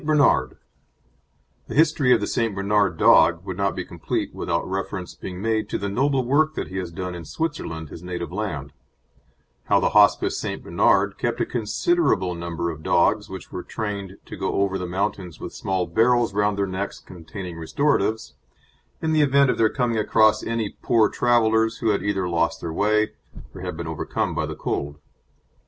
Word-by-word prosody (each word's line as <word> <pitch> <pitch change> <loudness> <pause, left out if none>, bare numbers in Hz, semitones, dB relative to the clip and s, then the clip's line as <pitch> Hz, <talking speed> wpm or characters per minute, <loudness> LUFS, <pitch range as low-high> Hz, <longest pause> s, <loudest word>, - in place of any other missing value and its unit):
BERNARD 145 - +3 1.1
The - - -6
history 150 -4 +4
of 120 - +6
the - - 0
St. 115 -1 -1
Bernard 100 -3 +1
dog 85 +3 +5
would 95 -2 -4
not 100 +1 0
be 90 -2 -4
complete 85 -2 -3
without - - -2
reference 95 -1 -4
being 90 -1 -8
made 110 -1 0
to - - -1
the 100 - -3
noble 130 +4 +1
work 155 +4 +2
that - - -4
he 95 - -6
has 90 -2 -3
done 90 +1 -5
in 85 -1 -7
Switzerland, 80 - -4
his 80 - -10
native 90 -1 -5
land: 80 -9 -4 0.9
how - - +3
the - - +1
Hospice - - +4
St. - - -4
Bernard - - +2
kept - - -1
a - - +1
considerable 115 - +1
number 85 0 -3
of 80 -1 -9
dogs 105 +6 +2
which 95 -1 -9
were 90 - -5
trained 100 -3 -5
to - - -8
go - - -2
over 95 -1 -1
the 90 - -4
mountains 90 -2 -3
with - - -7
small 95 -2 -1
barrels 115 +5 +2
round 105 0 +1
their 100 - +1
necks, 95 +1 -4
containing 90 0 -9
restoratives, 110 - 0 0.7
in 160 - +1
the 155 - +4
event 140 -2 +4
of - - -4
their 110 -1 +4
coming 120 -2 0
across 110 0 +4
any 115 -3 -3
poor 115 -3 +3
travellers 110 -2 +2
who 115 - 0
had 100 - +1
either 100 -2 -1
lost 85 -1 0
their 80 -1 -5
way, 105 +3 +2 0.4
or 95 - -9
had 90 -3 -5
been 85 - -5
overcome 80 -2 -2
by - - -1
the - - -5
cold. 75 +1 -3
100 Hz, 185 wpm, -23 LUFS, 90-115 Hz, 1.1 s, of